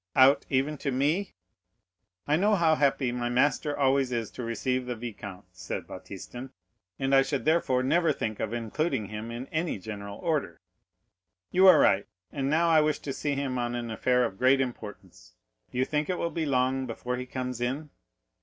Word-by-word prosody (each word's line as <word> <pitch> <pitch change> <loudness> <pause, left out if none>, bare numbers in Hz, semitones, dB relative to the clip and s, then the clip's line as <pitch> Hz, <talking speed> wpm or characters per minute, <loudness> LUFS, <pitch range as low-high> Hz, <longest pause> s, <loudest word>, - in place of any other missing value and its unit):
"Out, 130 +2 +5
even 135 +2 0
to 140 - -2
me?" 150 +10 0 0.9
"I 150 - +3
know 205 +6 +3
how 165 -4 +3
happy 140 -4 +2
my 120 0 -2
master 145 +4 +1
always 135 -2 +2
is 115 -3 -2
to - - -7
receive 125 +2 -2
the 125 - -2
vicomte," 105 -5 -8
said - - -6
Baptistin; 125 +2 -9 0.5
"and 135 0 -1
I 135 - +7
should 135 0 -2
therefore 150 -5 +2
never 165 +4 +3
think 110 -6 -3
of 110 - -2
including 120 - -2
him 105 +2 -6
in 120 +2 -5
any 160 -3 -1
general 100 0 -7
order." 145 - -2 0.9
"You 190 +1 +6
are 185 - +9
right; 95 +1 +3 0.2
and 135 -1 -2
now 165 +3 +3
I 160 -1 +6
wish 150 -1 +1
to 140 - -5
see 145 +1 -2
him 135 -2 -2
on 120 0 -2
an 120 -1 -4
affair 125 +3 +2
of 95 -4 -6
great 130 +2 +5
importance. 105 - -6 0.3
Do - - -8
you 130 - +2
think 150 +3 -1
it 180 - 0
will 170 - -2
be 160 -2 -2
long 130 0 +1
before 125 +2 -4
he 125 0 -5
comes 125 -2 -4
in?" 140 +5 -2
130 Hz, 190 wpm, -28 LUFS, 120-150 Hz, 0.9 s, are